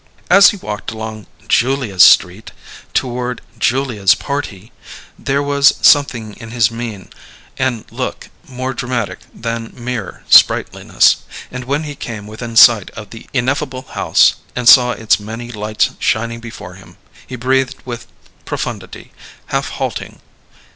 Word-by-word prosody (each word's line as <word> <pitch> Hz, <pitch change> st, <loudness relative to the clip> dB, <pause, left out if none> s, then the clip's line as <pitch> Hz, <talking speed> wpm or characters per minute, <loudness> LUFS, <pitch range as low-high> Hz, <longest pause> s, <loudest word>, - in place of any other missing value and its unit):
As 195 Hz, +2 st, +8 dB
he 205 Hz, -, -4 dB
walked 105 Hz, -, -6 dB
along 110 Hz, -1 st, -7 dB, 0.2 s
Julia's 120 Hz, -6 st, +1 dB
Street 90 Hz, +6 st, +5 dB, 0.4 s
toward 125 Hz, -1 st, -2 dB, 0.2 s
Julia's 120 Hz, -7 st, +2 dB
Party, 120 Hz, -7 st, -5 dB, 0.5 s
there 140 Hz, +1 st, -1 dB
was 140 Hz, 0 st, +3 dB
something 120 Hz, -7 st, +3 dB
in 115 Hz, -2 st, -10 dB
his 115 Hz, -2 st, +1 dB
mien 115 Hz, -4 st, -7 dB, 0.5 s
and 130 Hz, -4 st, -1 dB
look -, -, -5 dB, 0.2 s
more 130 Hz, 0 st, -4 dB
dramatic 125 Hz, -4 st, -3 dB
than 115 Hz, 0 st, -5 dB
mere 120 Hz, -6 st, -6 dB
sprightliness; -, -, +4 dB, 0.3 s
and 125 Hz, 0 st, -7 dB
when 140 Hz, +4 st, -1 dB
he 150 Hz, -1 st, -6 dB
came 110 Hz, -6 st, -7 dB
within 115 Hz, +2 st, -8 dB
sight 115 Hz, -4 st, +6 dB
of 105 Hz, -1 st, -9 dB
the 115 Hz, -, -11 dB
ineffable 130 Hz, 0 st, -2 dB
house -, -, +3 dB, 0.2 s
and 125 Hz, -1 st, -2 dB
saw 125 Hz, 0 st, +7 dB
its 110 Hz, -4 st, +1 dB
many 115 Hz, +3 st, -8 dB
lights 105 Hz, -1 st, -1 dB
shining 115 Hz, +1 st, -1 dB
before 115 Hz, -6 st, -10 dB
him, 95 Hz, +1 st, -16 dB, 0.3 s
he 130 Hz, -, -7 dB
breathed 130 Hz, +1 st, 0 dB
with 120 Hz, -2 st, -7 dB, 0.4 s
profundity, -, -, -6 dB, 0.4 s
half -, -, -1 dB
halting. -, -, -5 dB
120 Hz, 135 wpm, -16 LUFS, 110-130 Hz, 0.5 s, As